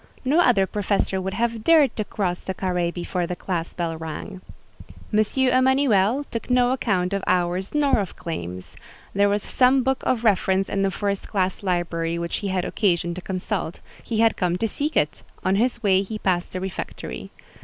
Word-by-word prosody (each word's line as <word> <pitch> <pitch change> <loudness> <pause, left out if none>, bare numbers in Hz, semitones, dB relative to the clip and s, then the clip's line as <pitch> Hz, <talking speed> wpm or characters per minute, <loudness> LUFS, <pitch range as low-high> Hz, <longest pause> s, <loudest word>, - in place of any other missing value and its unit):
No 290 +6 +3
other 235 - +4
professor 195 -1 -1
would 190 +1 -3
have 230 -1 -1
dared 315 -3 +5
to 215 - -1
cross 190 -4 -2
the 190 - -5
carré 180 -2 0
before 175 0 -3
the 180 - -3
class 175 -2 -4
bell 170 -2 -2
rang. 165 +4 -7 0.7
M. 210 - +4 0.2
Emanuel 260 -2 +3
took 230 - -5
no 250 0 +4
account 200 -7 0
of 200 -1 -1
hours 180 +5 0
nor 285 -5 +3
of 195 - -4
claims: 90 - -6 0.4
there 200 +1 +3
was 205 0 0
some 260 +1 +3
book 265 +1 0
of 240 -3 0
reference 195 -2 +2
in 195 - 0
the 195 - +2
first 200 +1 -2
class 190 -3 -1
library 170 -3 -1
which 170 0 -2
he 205 - -4
had 185 -2 -1
occasion 175 -4 +1
to 185 - -7
consult; 185 -2 -3 0.2
he 225 -2 -1
had 225 -1 +4
come 180 -1 0
to 225 - 0
seek 295 +7 -2
it: 150 - +1 0.2
on 190 +1 +3
his 235 +1 0
way 190 -2 +4
he 215 +2 -5
passed 180 -4 0
the 185 - -4
refectory. 175 - -6
195 Hz, 185 wpm, -24 LUFS, 180-230 Hz, 0.7 s, dared